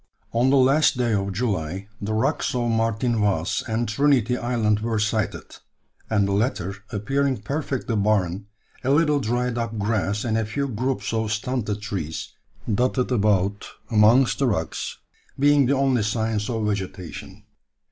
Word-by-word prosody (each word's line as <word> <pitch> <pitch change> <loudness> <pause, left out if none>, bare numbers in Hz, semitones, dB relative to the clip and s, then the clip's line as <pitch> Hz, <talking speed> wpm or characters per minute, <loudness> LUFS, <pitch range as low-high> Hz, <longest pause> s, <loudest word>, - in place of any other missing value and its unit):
On 120 +3 +3
the 140 - +4
last 135 +2 +4
day 120 -2 +1
of 100 -1 0
July 95 -4 -2
the 105 +2 -2
rocks 110 - 0
of 120 -1 0
Martin 115 +1 0
Vaz 100 -5 0
and 115 +1 -1
Trinity 125 0 +2
Island 115 -4 0
were 110 0 -1
sighted, 110 0 -2 0.5
and 100 -3 +2
the - - -1
latter 100 -3 0 0.2
appearing 130 +3 -1
perfectly 135 -2 -2
barren, 100 -2 0 0.4
a 130 - 0
little 150 0 +3
dried 120 0 -1
up 115 -1 -3
grass 105 -1 0
and 115 -2 0
a 110 - -1
few 140 +5 -2
groups 130 +1 -2
of 110 -1 -1
stunted 110 -2 -2
trees, 90 -7 -4 0.4
dotted 125 +3 +1
about 100 -3 +1 0.2
amongst 115 +4 +5
the 135 - +2
rocks, 85 -8 -2 0.4
being 145 -1 +4
the 140 - +3
only 135 -3 +2
signs 110 0 -1
of 110 -3 -1
vegetation. 95 0 -5
110 Hz, 150 wpm, -24 LUFS, 105-125 Hz, 0.5 s, amongst